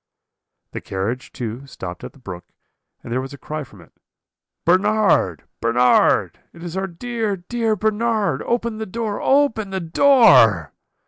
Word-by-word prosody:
"The - - -6
carriage, 105 +7 -4
too, 120 +3 -6
stopped 90 -9 -8
at - - -8
the - - -20
brook, 95 -9 -9 0.6
and 115 - -6
there 130 - 0
was 135 +2 -8
a - - -15
cry 155 +2 -6
from 110 -8 -16
it. 85 - -20 0.7
'Bernard, 185 - +2 0.2
Bernard! 120 +2 +3
It 170 - -12
is 175 0 -6
our 190 0 -2
dear, 220 +3 -3
dear 225 +4 -1
Bernard; 215 - 0
open 235 -2 -2
the 220 - -4
door, 215 0 -4
open 270 -7 +2
the 190 0 -3
door.' 160 - +5
175 Hz, 150 wpm, -21 LUFS, -, 0.7 s, door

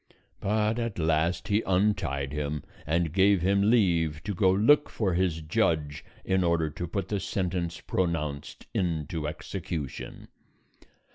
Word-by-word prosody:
But 110 +3 0
at 115 -3 -3
last 80 +1 +1
he 105 +1 +3
untied 90 -8 0
him, 75 0 -3 0.2
and 80 0 +1
gave 95 -1 +4
him 100 +2 +3
leave 85 -9 +2
to 105 +1 -3
go 95 +1 +3
look 110 +11 +4
for 100 -5 -1
his 85 -2 0
judge 75 -1 0 0.2
in 95 -1 +2
order 85 -2 +1
to 85 - -5
put 95 +2 -3
the 105 - 0
sentence 90 -3 -2
pronounced 75 -5 -2
into 80 -3 -1
execution. 80 -2 -6
85 Hz, 135 wpm, -28 LUFS, 80-100 Hz, 0.2 s, gave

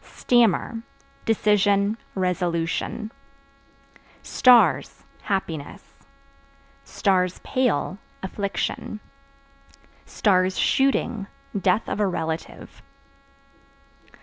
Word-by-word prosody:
Stammer 230 -1 +2 0.4
Decision, 205 -1 +2 0.2
resolution. 180 +3 -2 1.1
Stars 190 - +4 0.2
Happiness; 165 -7 -4 1.5
(pale) 240 - 0 0.2
affliction; 200 +2 -3 1.5
(shooting) 225 0 +1 0.3
death 195 +2 +1
of - - -3
relative. 165 -5 -3
200 Hz, 45 wpm, -24 LUFS, 180-220 Hz, 1.5 s, Stars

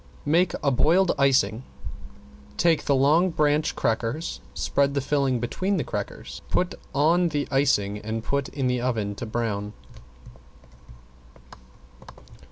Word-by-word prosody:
Make 170 +4 +2
a 140 - +3
boiled 165 +9 +3
icing. 125 -5 +3 1.0
Take 165 -3 +2
the 140 - +3
long 150 +7 +4
branch 150 -2 +1
crackers, 115 +8 -2
spread 140 0 0
the - - +2
filling 135 -2 0
between 185 - -1
the 150 - 0
crackers, - - -6
put 180 - 0 0.2
on 165 +5 +3
the 145 -2 -2
icing, 105 -7 +1
and 110 +1 -4
put 140 +1 -1
in 135 -2 -3
the 125 -1 0
oven 110 -5 -1
to 115 +3 -7
brown. 105 -2 -3
140 Hz, 125 wpm, -25 LUFS, 115-155 Hz, 1.0 s, long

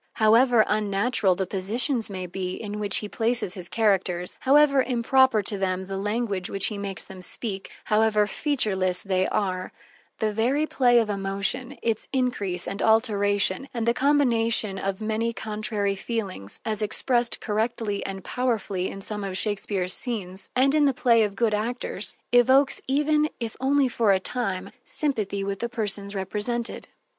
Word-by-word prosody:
However 230 +1 +5
unnatural 205 -1 +1
the 190 - -2
positions 225 +7 0
may 185 -2 -5
be 185 0 -4
in 210 -1 -6
which 205 -1 +2
he - - -4
places 225 -3 0
his 180 -3 -5
characters, 190 -5 +1
however 280 0 +5
improper 255 -2 +3
to 205 -2 +3
them 190 -1 -1
the 195 +1 -5
language 205 -1 -2
which 195 -1 +1
he 210 - -1
makes 195 -1 -4
them 190 -1 -11
speak, 195 +1 -1
however 215 -1 +3
featureless 195 -8 0
they 190 -1 +1
are, 185 -2 -2 0.5
the 215 -1 -1
very 255 +8 +1
play 245 -5 +3
of 230 -2 +3
emotion, 200 +7 -2
its 225 -2 -1
increase, 225 -9 -1
and 200 - -4
alteration, 205 +1 +2
and 230 -1 -1
the 235 - +4
combination 230 -7 +2
of 195 +1 -3
many 220 +2 -1
contrary 210 -2 -2
feelings, 195 - -4
as 220 -1 -2
expressed 240 +3 +1
correctly 215 -1 -2
and 195 -1 -6
powerfully 215 -7 -2
in 195 - -8
some 210 +1 -4
of 190 -1 -3
Shakespeare's 195 -3 -1
scenes, 200 -6 -3
and 265 +2 +3
in 300 -1 +4
the 275 -3 +2
play 235 -3 +4
of 205 -2 0
good 225 +1 +1
actors, 215 -2 -1 0.2
evokes 260 +3 +4
even, 300 +2 +2
if 230 -2 -4
only 275 +1 +2
for 225 -4 +2
a 190 - +2
time, 195 -3 -3
sympathy 215 -9 -2
with 195 -1 -3
the 235 - -2
persons 205 -4 -2
represented. 210 +5 -3
215 Hz, 160 wpm, -25 LUFS, 195-240 Hz, 0.5 s, However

